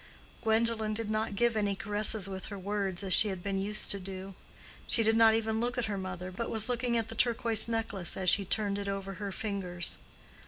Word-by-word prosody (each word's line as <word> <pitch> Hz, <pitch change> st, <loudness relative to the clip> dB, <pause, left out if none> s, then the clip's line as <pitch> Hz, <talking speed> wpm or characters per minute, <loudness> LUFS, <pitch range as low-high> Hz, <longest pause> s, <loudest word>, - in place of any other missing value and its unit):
Gwendolen 220 Hz, -1 st, +1 dB
did 220 Hz, -1 st, -3 dB
not 215 Hz, -1 st, -1 dB
give 235 Hz, +2 st, +2 dB
any 205 Hz, -2 st, 0 dB
caresses 205 Hz, 0 st, 0 dB
with 190 Hz, -1 st, -6 dB
her 200 Hz, -, -7 dB
words 195 Hz, -1 st, -2 dB
as 190 Hz, -2 st, +1 dB
she 215 Hz, -, +6 dB
had 190 Hz, -3 st, -5 dB
been 195 Hz, -1 st, -1 dB
used 210 Hz, +2 st, -3 dB
to 200 Hz, -, -1 dB
do. 190 Hz, +1 st, -8 dB, 0.5 s
She 230 Hz, -, +5 dB
did 220 Hz, +1 st, +3 dB
not 225 Hz, -1 st, +6 dB
even 220 Hz, 0 st, -1 dB
look 245 Hz, +1 st, -2 dB
at 245 Hz, -, 0 dB
her 210 Hz, -2 st, -3 dB
mother, 185 Hz, -1 st, -5 dB
but 230 Hz, +6 st, -4 dB
was 220 Hz, 0 st, +2 dB
looking 245 Hz, -1 st, 0 dB
at 225 Hz, -1 st, -2 dB
the -, -, -4 dB
turquoise 230 Hz, -1 st, +4 dB
necklace 225 Hz, -6 st, -2 dB
as 185 Hz, -, -3 dB
she 200 Hz, +3 st, +4 dB
turned 200 Hz, +1 st, 0 dB
it 200 Hz, -, -5 dB
over 195 Hz, 0 st, -4 dB
her 200 Hz, -1 st, -3 dB
fingers. 190 Hz, -4 st, -2 dB
210 Hz, 220 wpm, -30 LUFS, 195-225 Hz, 0.5 s, she